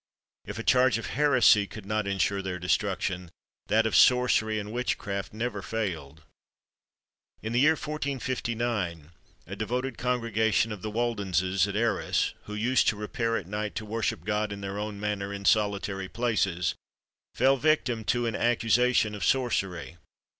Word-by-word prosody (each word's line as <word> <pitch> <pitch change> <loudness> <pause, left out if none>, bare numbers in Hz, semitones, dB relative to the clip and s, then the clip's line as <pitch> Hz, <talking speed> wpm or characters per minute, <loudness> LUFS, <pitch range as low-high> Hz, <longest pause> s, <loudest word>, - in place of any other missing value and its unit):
If 105 0 -7
a 115 - -4
charge 130 -2 +4
of 115 - -5
heresy 130 -8 +5
could 105 -1 -10
not 105 0 -1
ensure 100 0 0
their 95 -1 -4
destruction, 90 -1 -1 0.4
that 110 +1 +3
of 110 - 0
sorcery 125 -3 +4
and 105 0 -5
witchcraft 100 -5 -3
never 110 -2 -3
failed. 85 -9 -4 1.2
In 110 +1 -3
the 120 - +3
year 150 +4 +5
1459, 120 - -3 0.3
a 100 - -7
devoted 125 +4 -3
congregation 115 -3 +1
of 105 -3 -6
the 110 - -4
Waldenses 100 -5 0
at 100 - -5
Arras, 115 +2 0
who 105 - -6
used 120 +5 +2
to - - +3
repair 115 +2 -2
at 95 - -5
night 105 +2 -4
to 110 - -4
worship 115 +1 -2
God 105 0 -1
in 100 0 -6
their 100 +1 -4
own 105 -1 -5
manner 105 -1 -2
in 100 0 -6
solitary 100 -3 +1
places, 100 -8 0 0.6
fell 135 +2 +4
victims 125 -6 +1
to 120 0 +1
an 115 -2 -1
accusation 120 -1 +2
of 105 - -5
sorcery. 95 -10 0
110 Hz, 155 wpm, -27 LUFS, 100-120 Hz, 1.2 s, heresy